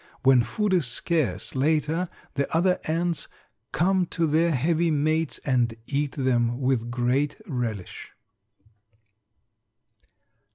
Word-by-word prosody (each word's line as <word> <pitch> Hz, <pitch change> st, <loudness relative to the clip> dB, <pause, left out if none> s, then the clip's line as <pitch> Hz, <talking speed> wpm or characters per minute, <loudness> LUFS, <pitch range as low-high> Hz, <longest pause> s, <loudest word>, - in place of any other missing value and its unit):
When 130 Hz, -2 st, +6 dB
food 195 Hz, -, -1 dB
is 170 Hz, -8 st, +2 dB
scarce 125 Hz, -, -1 dB
later 155 Hz, +5 st, +1 dB, 0.2 s
the 140 Hz, 0 st, -2 dB
other 180 Hz, +2 st, +2 dB
ants 170 Hz, +1 st, -1 dB, 0.4 s
come 185 Hz, +1 st, +2 dB
to 165 Hz, 0 st, -1 dB
their 160 Hz, +2 st, +2 dB
heavy 165 Hz, +4 st, +1 dB
mates 155 Hz, +2 st, 0 dB
and 120 Hz, -4 st, +1 dB
eat 145 Hz, +1 st, -1 dB
them 120 Hz, -3 st, +1 dB
with 130 Hz, -3 st, 0 dB
great 125 Hz, +4 st, 0 dB
relish. 120 Hz, -, -4 dB
145 Hz, 110 wpm, -25 LUFS, 125-165 Hz, 0.4 s, When